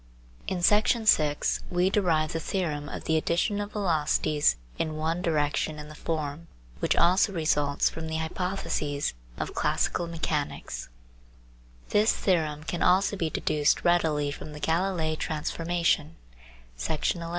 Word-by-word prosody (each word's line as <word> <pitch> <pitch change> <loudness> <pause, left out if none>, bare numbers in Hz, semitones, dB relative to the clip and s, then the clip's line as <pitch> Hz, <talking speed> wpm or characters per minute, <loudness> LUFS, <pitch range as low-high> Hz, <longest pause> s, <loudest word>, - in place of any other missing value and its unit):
In 180 -2 -2
Section 215 +3 +4
6 150 -7 +3
we 180 +2 +2
derived 165 -7 +1
the 165 - -1
theorem 155 -5 -2
of - - -6
the 160 - +1
addition 175 +6 0
of 205 0 -6
velocities 155 -5 +2 0.2
in 155 -1 -1
one 165 +3 -1
direction 150 -2 0
in 150 0 -8
the - - -9
form 155 0 -4 0.3
which - - +1
also 185 +4 +4
results 145 -4 +1
from 160 0 -4
the 160 0 -2
hypotheses 160 -3 -2 0.2
of - - -4
classical 175 - 0
mechanics 160 - -3 1.0
This 210 +2 +3
theorem 155 -5 0
can 170 +2 -4
also 195 +3 +3
be 165 -5 -1
deduced 150 -1 +1
readily 155 -4 +2
horn 150 +1 -8
the 150 - -8
Galilei 165 0 0
transformation 165 0 -1 0.6
(Section 155 - -1
11). 165 - -5
160 Hz, 140 wpm, -27 LUFS, 150-175 Hz, 1.0 s, Section